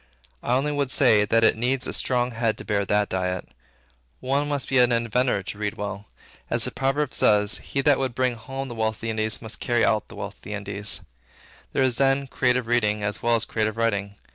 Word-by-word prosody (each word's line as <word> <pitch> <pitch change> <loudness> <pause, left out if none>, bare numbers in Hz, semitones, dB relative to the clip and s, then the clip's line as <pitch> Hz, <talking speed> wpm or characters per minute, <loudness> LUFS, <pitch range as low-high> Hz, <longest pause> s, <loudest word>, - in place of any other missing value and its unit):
I 120 - -1
only 140 +3 0
would 145 -2 -1
say, 110 -7 +4
that 115 +2 +2
it - - +5
needs 125 +3 -1
a - - -3
strong 125 -1 +1
head 115 -1 -1
to - - -9
bear 100 -2 0
that 105 +1 +1
diet. 90 -1 -3 0.7
One 140 +3 0
must 145 -3 -1
be 135 -1 +2
an 125 0 +5
inventor 115 -2 +1
to 100 - -7
read 105 -1 -2
well. 105 0 -6 0.4
As - - +1
the - - -2
proverb 135 +1 -1
says, 105 0 +3
"He 140 - -3
that 140 0 +3
would 130 -3 -2
bring 130 -1 +1
home 135 +4 -6
the 120 - -7
wealth 110 -1 -1
of - - -20
the 115 0 -2
Indies, 110 +1 0
must 110 - -5
carry 120 -2 +1
out 105 -1 +1
the - - -12
wealth - - -7
of - - -31
the 105 - -6
Indies." 100 -3 -1 0.7
There - - +2
is 125 -3 +1
then 135 0 +2
creative 125 -2 0
reading 105 -3 +1
as 100 0 -2
well 120 0 +3
as 115 - -1
creative 110 0 -2
writing. 100 -3 -1
115 Hz, 225 wpm, -24 LUFS, 105-130 Hz, 0.7 s, it